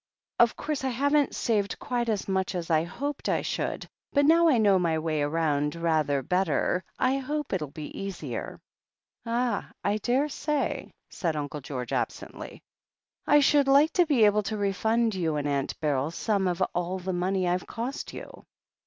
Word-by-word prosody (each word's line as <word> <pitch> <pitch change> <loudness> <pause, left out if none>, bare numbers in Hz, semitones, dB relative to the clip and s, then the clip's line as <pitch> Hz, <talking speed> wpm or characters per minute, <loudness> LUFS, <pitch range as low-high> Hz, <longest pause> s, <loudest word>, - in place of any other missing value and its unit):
Of 235 -1 +5
course 295 -2 -3
I - - +1
haven't 285 +3 +2
saved 205 -4 0
quite 240 -2 -2
as 210 -3 -1
much 190 0 -1
as 170 -1 -3
I 160 0 +3
hoped 285 +10 -4
I - - +1
should, - - -3 0.3
but 285 -1 +4
now 335 +2 +6
I 270 - +4
know 200 -4 +4
my 165 -3 +1
way 155 -1 -1
about 150 0 0
rather 155 -5 +1
better 180 +1 +1
I 260 +1 +2
hope 295 +1 -3
it'll 160 -6 -1
be 150 +1 -8
easier." 165 - -5 0.7
"Ah, 240 +1 -1
I 205 +1 +1
daresay," 280 +5 -1 0.2
said 165 -4 -2
Uncle 150 0 -4
George 130 -2 -5
absently. - - -4 0.6
"I 295 0 +6
should 285 0 +4
like 285 +4 +5
to 355 -2 +3
be 255 -8 +5
able 210 0 +4
to 215 +1 -3
refund 220 +3 +1
you 165 -5 -1
and 145 -1 -1
Aunt 140 -1 -2
Beryl 145 -2 0
some 195 +3 0
of 180 +1 0
all 180 +1 -1
the 185 0 -4
money 185 +2 0
Tve 180 0 0
cost 245 +4 -5
you." - - -10
195 Hz, 170 wpm, -27 LUFS, 160-255 Hz, 0.7 s, now